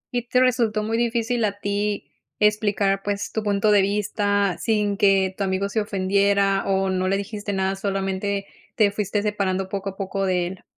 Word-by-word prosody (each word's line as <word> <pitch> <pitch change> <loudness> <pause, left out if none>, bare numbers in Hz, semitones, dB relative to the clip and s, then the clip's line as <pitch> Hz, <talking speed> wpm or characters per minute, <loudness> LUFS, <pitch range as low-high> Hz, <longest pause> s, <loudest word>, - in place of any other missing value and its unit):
¿Y 245 0 -1
te 250 - +2
resultó 230 -4 +2
muy 220 +1 -1
difícil 235 0 0
a 205 -1 -1
ti 205 0 -2 0.3
explicar, 205 -2 +2
pues, 205 0 -3
tu 220 - -2
punto 205 0 +1
de 205 -1 +5
vista 205 -1 0
sin 210 -3 +1
que 195 -2 +3
tu 200 - -2
amigo 195 +1 -1
se 215 +2 0
ofendiera 200 0 +1
o 190 -1 +1
no 185 0 0
le 195 +1 +1
dijiste 205 0 -5
nada, 190 0 0
solamente 195 0 -2 0.3
te 210 -3 +3
fuiste 205 0 -2
separando 195 -3 -1
poco 195 0 -3
a 190 - -11
poco 195 0 -2
de 180 -1 +1
él? 185 +1 -9
200 Hz, 185 wpm, -23 LUFS, 195-210 Hz, 0.3 s, de